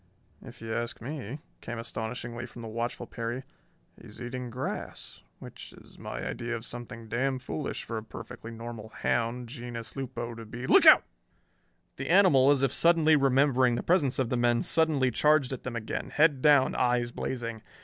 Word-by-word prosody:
"If - - -12
you 110 0 -4
ask 120 0 -3
me," 135 0 -6 0.2
came 120 - -6
astonishingly 120 +1 -5
from 120 0 -11
the - - -6
watchful 115 +2 -3
Perry, 120 +3 -4 0.6
"he's - - -13
eating 125 0 -5
grass, 125 +4 -6 0.2
which - - -11
is - - -16
my - - -6
idea 120 0 -3
of 115 +1 -7
something 115 -2 -8
damn 130 +4 0
foolish 135 +3 -5
for 115 -1 -4
a - - -10
perfectly 110 +2 -9
normal 115 -1 -8
hound, 120 +2 -1
genus 120 -2 -7
lupo, 125 -3 -5
to 115 0 -9
be 120 +3 -7
Look - - +6
out!" - - +9 0.9
The - - -5
animal, 165 -8 +6
as 140 -2 +3
if 135 - +2
suddenly 160 +1 +5
remembering 135 -3 +3
the - - -3
presence 155 -7 +2
of 130 -3 0
the 125 - 0
men, 120 -1 +2
suddenly 155 -6 +3
charged 150 0 +3
at 130 - -6
them 125 -1 -5
again, 110 -2 -4
head 150 -3 +3
down, 145 -2 +5
eyes 120 -1 +1
blazing. 115 -3 -4
120 Hz, 175 wpm, -29 LUFS, 115-135 Hz, 0.9 s, out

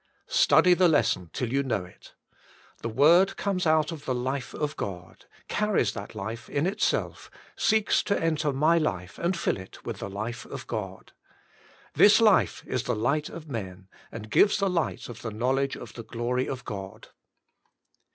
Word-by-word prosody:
Study 340 - +5
the 180 0 +4
lesson 120 - +1
till 125 +6 -3
you 140 - +2
know 110 -9 -2
it. 90 - -17 0.7
The 115 - -3
word 170 - +4
comes 190 -4 -1
out 155 0 +3
of 155 -3 -8
the 130 - -1
life 130 +1 -3
of 150 -1 -2
God, 90 -3 -7 0.2
carries 210 - +1
that 100 +2 -8
life 110 +3 -6
in 145 +3 0
itself, 205 +4 -1 0.3
seeks 220 -1 +2
to 200 - +1
enter 155 -2 0
my 155 +5 +3
life 90 - -3
and 175 +1 0
fill - - 0
it 95 0 -12
with - - -5
the 100 - -5
life 110 +5 -5
of - - -8
God. 95 -5 -6 0.8
This 210 +2 +6
life 215 -4 +3
is 130 -1 -2
the - - 0
light 140 +8 0
of 165 -2 -9
men, 95 -7 -6 0.2
and 110 -1 -9
gives 205 - +5
the 195 -2 +1
light 170 -3 -2
of 120 -2 -9
the 115 - -4
knowledge 130 +5 0
of 115 -3 -10
the 115 - -7
glory 120 +3 -2
of 130 -1 -5
God. 100 -3 -7
130 Hz, 175 wpm, -27 LUFS, 110-170 Hz, 0.8 s, This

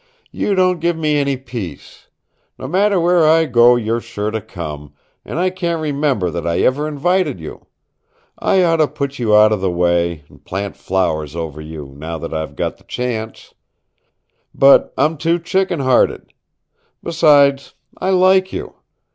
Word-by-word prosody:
"You 200 - -1
don't 185 -1 +2
give 170 0 0
me 155 -2 0
any 140 -2 0
peace. 120 -8 -9 0.5
No - - -7
matter 195 +5 +2
where 175 0 +3
I 160 +1 +4
go 120 -3 +5
you're 115 0 -1
sure 110 -2 -4
to 110 0 -3
come, 75 -8 -8 0.3
and - - -6
I 185 +1 +1
can't 170 -3 -2
remember 140 - -1
that 85 +1 -4
I 85 0 0
ever 145 +4 +1
invited 155 - 0
you. 80 - -10 0.7
I 190 - +2
oughta 165 -3 +3
put 140 -1 -5
you 110 -3 +2
out 105 0 +6
of 105 -3 -1
the 95 - 0
way, 85 -2 0
and - - -20
plant 100 +1 -5
flowers 80 -5 -2
over 80 -3 -5
you, 75 -3 -9
now 80 +3 -6
that 80 +1 -7
I've 80 -2 -4
got - - -3
the - - -24
chance. 115 -3 -5 1.0
But 135 0 +5
I'm 155 +1 +1
too 165 +3 +1
chicken 175 -1 -1
hearted. 130 -2 +1 0.7
Besides, 145 -4 +3 0.2
I 190 - -3
like 185 0 +3
you. - - -6
130 Hz, 165 wpm, -18 LUFS, -, 1.0 s, out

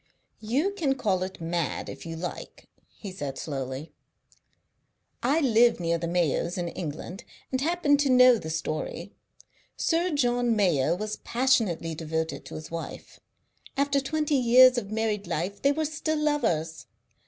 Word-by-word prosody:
"You 260 - 0
can 310 -9 0
call 200 -8 0
it 185 +1 -5
mad, 170 -1 -2
if - - -8
you 165 - -5
like," 175 +2 -7 0.3
he 200 - -7
said 145 -7 -5
slowly. 135 0 -5 1.3
"I 285 +7 +2
live 235 - +4
near 170 -1 0
the 170 - -3
Mayos' 170 0 0
in 175 -1 -2
England, 170 +4 -6 0.3
and 260 0 -1
happen 315 -2 +2
to 285 -1 +1
know 250 -2 +7
the 160 - -7
story. 155 -1 -4 0.6
Sir 340 +2 +1
John 245 -6 +1
Mayo 170 -6 +2
was 215 +3 -4
passionately 225 -10 +1
devoted 160 0 -3
to - - -9
his 155 +1 -8
wife; 165 0 -7 0.6
after 280 0 +2
twenty 300 +2 -1
years 255 +1 +7
of 200 - -9
married 215 -3 -1
life 175 +4 -3
they 280 - +4
were 310 +2 -1
still 310 +1 -2
lovers. 175 - -1
215 Hz, 150 wpm, -27 LUFS, 165-270 Hz, 1.3 s, know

